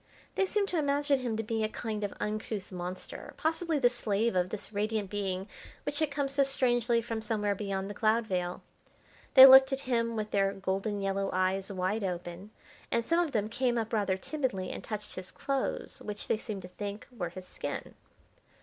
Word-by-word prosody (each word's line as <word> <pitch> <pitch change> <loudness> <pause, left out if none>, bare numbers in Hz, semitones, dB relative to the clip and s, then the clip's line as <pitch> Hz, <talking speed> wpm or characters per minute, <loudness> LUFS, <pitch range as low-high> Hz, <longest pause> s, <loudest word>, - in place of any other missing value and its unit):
They 385 - +1
seemed 410 0 +1
to 345 - +1
imagine 285 -1 +2
him 240 -4 -2
to 225 - -1
be 220 0 -1
a 215 - 0
kind 215 -2 -4
of 200 - -1
uncouth 210 -2 -3
monster, 180 0 -6
possibly 325 0 0
the 260 -3 +5
slave 230 -2 0
of 180 0 +2
this 215 +1 -6
radiant 210 -1 -1
being 195 -2 -2 0.4
which 295 - -1
had 310 -2 +2
come 285 -1 -1
so 275 +1 +1
strangely 240 -3 +2
from 225 -1 -3
somewhere 210 -2 0
beyond 195 -1 -3
the 205 - -5
cloud 220 +2 +2
veil. 180 -3 -2 0.7
They 265 -1 +13
looked 265 0 +9
at 270 0 -1
him 230 -3 0
with 215 -1 -3
their 195 -1 +2
golden 195 +2 -2
yellow 195 0 0
eyes 185 +2 0
wide 195 +3 -1
open, 180 +1 -4 0.4
and 235 0 0
some 335 +5 +2
of 340 -4 +1
them 215 -4 0
came 240 +2 0
up 225 0 -2
rather 200 -3 +1
timidly 245 -6 -2
and - - -6
touched 210 -1 -5
his 185 0 -6
clothes, 275 -1 -3
which 210 -1 -6
they - - +2
seemed 210 -3 -6
to - - -7
think 200 +3 -6
were 175 -7 -3
his 185 +1 -10
skin. - - -5
215 Hz, 195 wpm, -30 LUFS, 195-250 Hz, 0.7 s, They